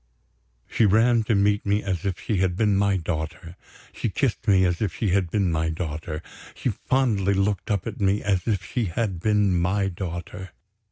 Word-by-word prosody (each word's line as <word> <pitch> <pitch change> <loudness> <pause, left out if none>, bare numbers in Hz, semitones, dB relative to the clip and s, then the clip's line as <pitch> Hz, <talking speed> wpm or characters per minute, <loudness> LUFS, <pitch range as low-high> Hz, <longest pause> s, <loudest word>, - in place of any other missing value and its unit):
She 110 - +2
ran 115 +3 +4
to 110 - +2
meet 100 +1 +2
me 100 +1 0
as 95 -3 -3
if 95 -3 -2
she 105 - -2
had 90 -1 +1
been 105 0 +2
my 100 0 +2
daughter; 85 +1 -5 0.4
she - - -2
kissed - - -1
me 95 -2 +5
as 90 -1 0
if 95 -7 -1
she 110 - -1
had 95 -1 +1
been 95 -1 +1
my 80 0 0
daughter; 80 -1 -4 0.3
she - - -2
fondly 105 -7 +1
looked 100 0 0
up 100 -3 0
at 110 -2 -6
me 100 +1 +2
as 95 -1 0
if 100 -6 0
she 120 +5 -2
had 95 0 -2
been 105 -1 +2
my 95 +3 +1
daughter. 90 0 -6
95 Hz, 190 wpm, -24 LUFS, 90-105 Hz, 0.4 s, me